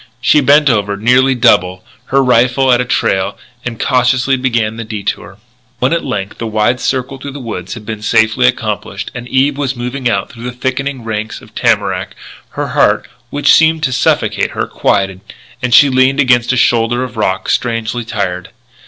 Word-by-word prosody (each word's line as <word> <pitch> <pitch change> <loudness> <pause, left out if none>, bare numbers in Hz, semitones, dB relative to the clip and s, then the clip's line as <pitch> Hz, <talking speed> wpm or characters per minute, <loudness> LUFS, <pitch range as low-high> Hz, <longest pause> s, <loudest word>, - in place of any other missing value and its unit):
She 145 +5 +3
bent 145 +2 +4
over 105 -5 +1
nearly 125 +5 +3
double, 90 -5 +2 0.2
her 135 0 +2
rifle 125 +1 +3
at 120 0 +3
a - - -2
trail, 95 -4 0 0.3
and 115 -2 -5
cautiously 130 +1 +2
began 115 -4 -1
the 115 - -4
detour. 105 -3 -5 0.4
When 130 +6 +1
at 170 - -1
length 105 -7 -4
the 115 - -3
wide 110 +3 0
circle 130 +1 -2
through 140 +1 -7
the 145 - -7
woods 95 -7 -6
had 110 -2 -10
been 110 -1 -6
safely 110 - +2
accomplished - - -3
and 125 -1 -7
Eve 135 +3 +1
was 135 -2 -1
moving 125 +1 -3
out - - -2
through 120 -2 -10
the 125 - -4
thickening 130 0 -3
ranks 110 -1 -4
of - - -18
tamarack, - - 0 0.4
her - - -2
heart, - - +2 0.2
which 145 +3 +3
seemed 160 -1 +3
to 130 -4 0
suffocate 125 - +1
her, - - -2
quieted; 95 -2 -1 0.4
and 125 -1 -2
she 140 +4 +7
leaned 130 +1 +2
against 125 -3 +3
a 130 - 0
shoulder 120 +1 +2
of 125 -4 -7
rock, 95 -3 -1
strangely 115 0 -1
tired. 95 -6 -4
125 Hz, 180 wpm, -14 LUFS, 110-130 Hz, 0.4 s, she